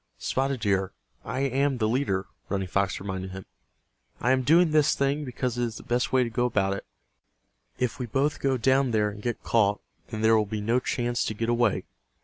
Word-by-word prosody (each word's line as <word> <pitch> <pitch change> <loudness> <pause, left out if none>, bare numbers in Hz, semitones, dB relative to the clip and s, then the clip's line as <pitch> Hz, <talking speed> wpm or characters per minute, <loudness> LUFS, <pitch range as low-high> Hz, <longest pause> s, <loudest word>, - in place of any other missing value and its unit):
"Spotted 135 -2 -1
Deer, 95 -3 +1 0.3
I 130 - -3
am 135 0 +1
the 110 -2 +1
leader," 110 -6 0 0.2
Running 95 -1 -1
Fox 100 +1 0
reminded 95 -1 -4
him. 95 0 -8 0.7
"I 125 - +2
am 130 0 +3
doing 160 +5 +4
this 155 -1 +4
thing 140 +2 0
because 125 -1 -3
it - - +1
is 115 -1 -5
the - - -10
best 120 +1 0
way 130 -1 +4
to 120 - -2
go 120 +2 +1
about 100 -4 +1
it. 100 - -7 0.9
If 125 +1 -1
we 125 - -3
both 140 +6 0
go 135 -1 +1
down 130 +2 +3
there 105 -2 +1
and 105 0 -10
get 120 0 -3
caught 105 -3 +2 0.3
then 110 -1 -5
there 110 0 +6
will 105 -1 +2
be 110 +1 -3
no 115 +4 +1
chance 120 -1 -1
to 110 - -3
get 115 +2 -2
away. 120 -3 +2
120 Hz, 210 wpm, -27 LUFS, 105-130 Hz, 0.9 s, there